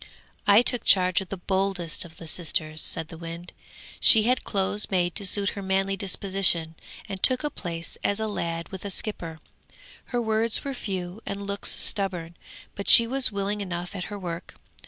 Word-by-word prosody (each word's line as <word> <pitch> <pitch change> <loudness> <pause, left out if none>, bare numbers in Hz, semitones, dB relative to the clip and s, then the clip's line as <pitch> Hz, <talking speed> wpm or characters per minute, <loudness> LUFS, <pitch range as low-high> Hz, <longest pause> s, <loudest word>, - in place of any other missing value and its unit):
'I 205 +3 +6
took 245 -1 +3
charge 185 -1 +4
of 190 - -9
the 195 - -5
boldest 190 -3 -2
of 165 -1 -14
the 165 - -10
sisters,' 155 -1 -1
said 165 -1 -1
the 165 - -11
wind. 170 +1 -8 0.5
'She 220 -2 +6
had 250 +2 +1
clothes 200 +1 -1
made 175 -2 0
to 200 - -1
suit 200 +1 +1
her 200 - -7
manly 195 0 0
disposition, 190 -4 +2 0.3
and 195 -2 -7
took 255 +2 +4
a 295 - -2
place 170 -2 -6
as 205 +1 0
a 220 - -1
lad 170 -5 -4
with 190 -1 -8
a 200 - -4
skipper. 170 -5 -3 0.7
Her 245 - -2
words 220 0 +1
were 275 - -4
few 190 -4 -5
and 200 0 -6
looks 200 0 -1
stubborn, 180 -4 -1 0.4
but 200 - -1
she 235 - +11
was 260 0 +1
willing 200 +1 -3
enough 180 0 -5
at 180 - -4
her 205 - -7
work. 175 -3 -7
195 Hz, 185 wpm, -25 LUFS, 175-205 Hz, 0.7 s, she